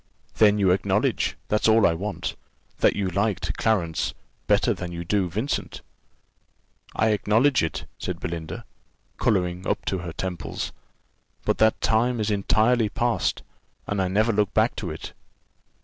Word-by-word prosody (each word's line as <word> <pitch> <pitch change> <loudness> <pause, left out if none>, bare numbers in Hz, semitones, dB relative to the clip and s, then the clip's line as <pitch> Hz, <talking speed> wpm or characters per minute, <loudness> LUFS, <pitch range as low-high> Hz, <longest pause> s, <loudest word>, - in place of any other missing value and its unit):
"Then 105 -1 +5
you 95 -3 +3
acknowledge 95 - +1
that's 105 +1 +2
all 110 0 +5
I 85 - +4
want 100 +4 -4 0.4
that - - +4
you 100 -2 -1
liked 100 +1 -1
Clarence 90 -8 0 0.3
better - - +3
than 90 -1 -6
you 85 0 -5
do 95 +1 0
Vincent?" 110 - -3 1.1
"I 110 - +2
acknowledge 110 +6 +3
it," 80 - -3
said 90 -2 -4
Belinda, 85 -3 -5 0.5
colouring 90 -1 0
up - - -1
to 95 - -1
her 85 -1 -5
temples; 85 -2 -4 0.7
"but - - +1
that 110 0 +4
time 120 +2 +2
is 105 0 0
entirely 110 +3 +2
past, 120 +1 0 0.4
and 100 -1 -1
I 95 - +1
never 110 +5 +2
look 105 -1 0
back - - +3
to - - -3
it." - - -7
100 Hz, 150 wpm, -25 LUFS, 90-110 Hz, 1.1 s, Then